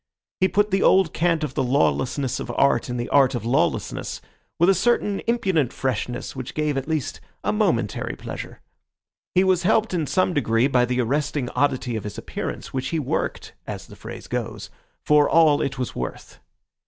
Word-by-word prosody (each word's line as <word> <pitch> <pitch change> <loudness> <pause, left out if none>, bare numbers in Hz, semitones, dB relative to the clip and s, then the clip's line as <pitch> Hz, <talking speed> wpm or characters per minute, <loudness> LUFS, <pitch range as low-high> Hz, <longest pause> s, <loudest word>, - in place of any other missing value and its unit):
He 185 - +4
put 205 +1 +1
the 195 - +2
old 190 -4 +4
cant 165 -1 +1
of 145 -4 -3
the - - 0
lawlessness 130 0 +1
of - - -4
art 135 -3 +2
and 125 0 -3
the 120 - -2
art 135 -2 +4
of 115 -2 -4
lawlessness 125 +4 0 0.4
with 170 - +4
a 195 - +6
certain 205 0 +1
impudent 190 - +1
freshness 125 -1 -3
which 130 0 -6
gave 150 -2 0
at 135 0 -3
least 155 -5 -2 0.2
a - - 0
momentary - - 0
pleasure. - - -8 0.7
He 185 - +5
was 185 -2 +3
helped 220 +2 +2
in 165 -5 0
some 185 +2 +1
degree 115 -4 +2
by 125 -3 +3
the 125 +1 0
arresting 140 +1 -1
oddity 130 -4 0
of 110 - -3
his 105 - -6
appearance, - - -5
which 130 0 -2
he 165 - -1
worked, 145 -5 -2
as - - -6
the - - -13
phrase - - -9
goes, - - -4 0.3
for 150 -1 +4
all 160 -3 +5
it 135 0 -2
was 125 -1 -3
worth. 60 -1 -6
145 Hz, 185 wpm, -23 LUFS, 125-175 Hz, 0.7 s, a